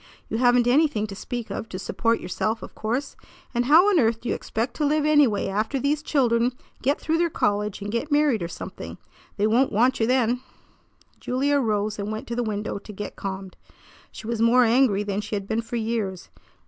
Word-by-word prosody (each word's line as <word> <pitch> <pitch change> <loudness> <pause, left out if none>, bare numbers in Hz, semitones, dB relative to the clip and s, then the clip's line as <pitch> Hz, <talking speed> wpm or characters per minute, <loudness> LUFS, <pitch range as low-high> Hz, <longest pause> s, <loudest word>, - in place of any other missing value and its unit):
You 225 - -2
haven't 245 -1 +4
anything 250 -4 +3
to 200 -2 -8
speak 240 +3 -5
of 225 - -5
to 185 - -5
support 230 +5 0
yourself, 215 +4 -2
of - - -9
course, 245 +6 -3 0.4
and 240 0 +1
how 320 +8 +6
on 395 -5 +4
earth 225 -3 +2
do 245 - -4
you - - +1
expect 230 +3 -3
to 305 - -1
live 300 0 +1
anyway 290 -9 +4
after 215 +7 -1
these 285 +3 0
children 245 -5 +2 0.3
get 280 +3 +1
through 325 +1 0
their 340 0 +2
college 210 - -1
and 205 - -4
get 235 +7 -2
married 290 -7 +3
or 170 - -2
something? - - -8 0.4
They 205 - +2
won't 240 +5 +3
want 245 +5 +2
you 225 - +2
then." 250 -1 +2 0.8
Julia 280 +3 +1
arose 215 -3 -1
and 205 +1 -3
went 215 0 -5
to 235 - -2
the 245 - 0
window 210 -2 -3
to 210 - -11
get 205 0 -7
calmed. 190 -1 -6 0.5
She - - -10
was 230 0 -2
more 240 +2 +5
angry 230 -3 +3
than 205 0 -2
she 210 0 -4
had 200 -1 -4
been 220 +1 0
for 230 +1 -7
years. 220 -5 -3
230 Hz, 210 wpm, -24 LUFS, 210-260 Hz, 0.8 s, how